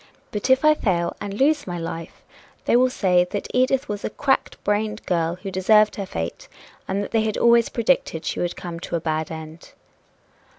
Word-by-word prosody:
But 210 +4 -3
if 260 +3 +4
I 305 - +7
fail 175 - 0
and 205 - -4
lose 280 +7 +1
my 175 -1 -3
life, 165 0 -7 0.4
they - - +3
will 255 +1 +5
say 180 -7 +3
that 205 - -4
Edith 255 +1 +2
was 205 -1 -4
a - - -1
cracked 270 +3 0
brained 210 +1 -1
girl 170 -1 0
who 195 - -4
deserved 210 +3 +4
her 200 -2 -4
fate, 80 - -5 0.4
and 195 +1 -1
that - - -7
they 225 - +2
had 215 -1 -1
always 235 -1 +4
predicted 230 -9 0
she - - -2
would 175 0 -1
come 170 -2 -7
to 170 - -4
a - - +1
bad 160 -1 -2
end." 160 0 -9
200 Hz, 200 wpm, -23 LUFS, 170-235 Hz, 0.4 s, I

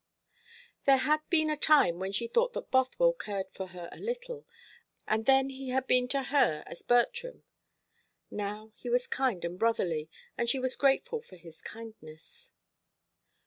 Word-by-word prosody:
There 275 -1 +6
had 300 +4 +2
been 315 -2 +3
a - - +1
time 290 - +4
when 190 +1 -3
she 220 +4 -1
thought 480 - +1
that - - -6
Bothwell 260 - +3
cared 200 - -5
for 190 - -6
her 180 -2 -9
a - - -11
little, 480 0 -5 0.6
and 220 +1 0
then 270 0 +4
he 265 0 -7
had 260 +1 0
been 250 -1 +4
to 275 +1 -1
her 260 - +2
as - - -8
Bertram. 480 - +1 0.9
Now 210 +2 -5
he 245 - -8
was 245 +1 +2
kind 250 -10 -1
and 175 +2 -5
brotherly, 175 -9 0 0.3
and 235 0 +1
she 270 - +1
was 255 0 -2
grateful 445 - +1
for 185 - -16
his 165 -2 -14
kindness. 215 -9 -12
250 Hz, 165 wpm, -30 LUFS, 200-285 Hz, 0.9 s, There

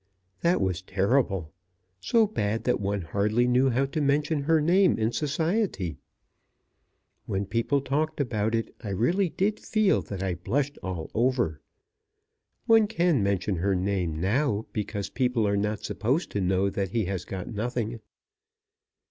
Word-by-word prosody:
That 170 +2 +2
was 95 -3 0
terrible; 95 - 0 0.5
so 225 - +3
bad 115 - -2
that - - +1
one 100 -1 -1
hardly 105 +8 +1
knew 125 +2 +3
how 130 +3 +1
to 145 +3 -3
mention 145 +2 +1
her 160 +1 +4
name 180 +5 +4
in 110 +1 +1
society! 155 - -1 1.3
When 95 +1 -1
people 115 +7 0
talked 150 +4 -1
about 110 -4 0
it, 115 - -2
I 105 - -4
really 170 - +1
did 205 +6 0
feel 215 -3 +2
that 95 -2 -6
I 95 -2 0
blushed 135 - -2
all 90 -4 -5
over. 120 - +1 1.0
One 225 -2 +5
can 170 - +2
mention 100 -1 0
her 95 +3 +1
name 90 -4 -1
now 110 - +1
because 105 -2 -3
people 125 -4 +1
are 100 - +1
not 105 +1 -1
supposed 130 +10 -1
to 100 - -1
know 95 +1 +1
that 95 -1 -2
he 110 +1 0
has 95 -1 -3
got 95 -2 -6
nothing. 115 +1 -2
115 Hz, 150 wpm, -27 LUFS, 100-145 Hz, 1.3 s, One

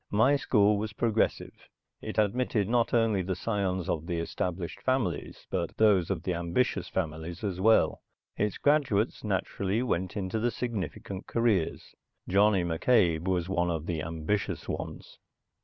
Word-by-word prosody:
My 110 +7 +4
school 105 -6 +3
was 110 +1 -4
progressive. 110 0 -1 0.3
It - - -6
admitted 110 0 +1
not 120 +1 +2
only 115 -4 +2
the 95 +1 -2
scions 95 -5 -1
of 80 0 -2
the 85 - -2
established 85 +1 -3
families 120 - -1
but 85 -3 -2
those 100 -6 +4
of 95 -5 -2
the 90 - -1
ambitious 85 +9 0
families 80 +1 -4
as 95 -3 -2
well. 110 +2 +4 0.3
Its 105 -1 -1
graduates, 135 -8 +1
naturally, 100 +1 -1
went 95 -5 -2
into 100 +2 -2
the 120 +2 +1
significant 100 -4 -5
careers. 115 -8 0 0.3
Johnny 100 0 +4
McCabe 85 -1 +2
was 90 -2 0
one 90 -2 0
of 80 -2 -2
the 85 -3 -2
ambitious 80 +6 -2
ones. - - -6
100 Hz, 145 wpm, -29 LUFS, 85-110 Hz, 0.3 s, My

